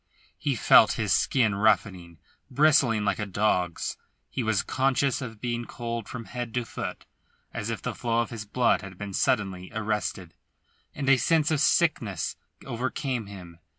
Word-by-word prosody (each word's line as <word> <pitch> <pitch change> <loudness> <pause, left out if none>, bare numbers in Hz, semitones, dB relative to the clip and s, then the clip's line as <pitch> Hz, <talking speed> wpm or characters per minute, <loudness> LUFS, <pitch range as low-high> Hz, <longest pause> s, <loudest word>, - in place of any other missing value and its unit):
He 140 +4 0
felt - - +6
his - - 0
skin 115 -6 +2
roughening, 95 -4 +1 0.3
bristling 130 -6 +3
like 100 - 0
a 105 - -2
dog's; 90 -3 0 0.3
he - - -2
was 110 -4 +1
conscious 135 +1 +1
of 115 -4 -7
being 120 +1 -3
cold 115 -2 -5
from 120 -2 -6
head 120 -1 -5
to 125 -1 0
foot, - - -6 0.5
as 115 -1 -4
if 115 - -4
the - - -2
flow 115 -1 0
of 115 - -4
his 115 -2 -5
blood 120 +4 +2
had 95 -2 -10
been 100 0 -6
suddenly 95 -7 0
arrested; 105 -5 -2 0.6
and 140 -2 -4
a 135 -1 +6
sense 155 +5 +2
of 155 - +2
sickness 120 - +1 0.3
overcame 125 -1 -3
him. 90 -4 -11
115 Hz, 160 wpm, -27 LUFS, 100-125 Hz, 0.6 s, felt